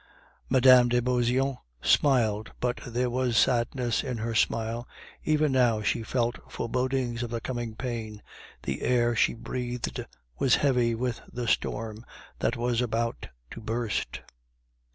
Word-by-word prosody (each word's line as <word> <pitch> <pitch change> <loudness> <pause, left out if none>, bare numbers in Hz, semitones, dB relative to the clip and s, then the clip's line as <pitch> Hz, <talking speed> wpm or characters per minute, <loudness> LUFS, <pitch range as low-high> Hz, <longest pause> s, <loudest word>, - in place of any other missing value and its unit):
Mme. 125 -1 +7
de 120 0 +2
Beauseant 125 +2 +1 0.2
smiled 110 - +2
but 125 0 -1
there 125 +1 0
was 125 -1 +1
sadness 120 -1 +2
in 125 -4 -3
her 115 +1 -3
smile; 115 +1 0 0.4
even 155 -1 +2
now 120 -5 +3
she 105 - +1
felt 120 +1 -1
forebodings 125 -1 -1
of 120 - -3
the 115 0 -2
coming 120 -2 -4
pain, 115 -4 -5 0.4
the 70 0 -3
air 120 -1 +2
she 115 - +2
breathed 125 +1 -4 0.4
was 130 - +4
heavy 125 -5 +2
with 120 0 -2
the 120 -1 -4
storm 110 0 -1 0.4
that 115 - 0
was 120 0 0
about 115 -1 -2 0.2
to - - -8
burst. 115 0 -2
120 Hz, 135 wpm, -28 LUFS, 115-125 Hz, 0.4 s, Mme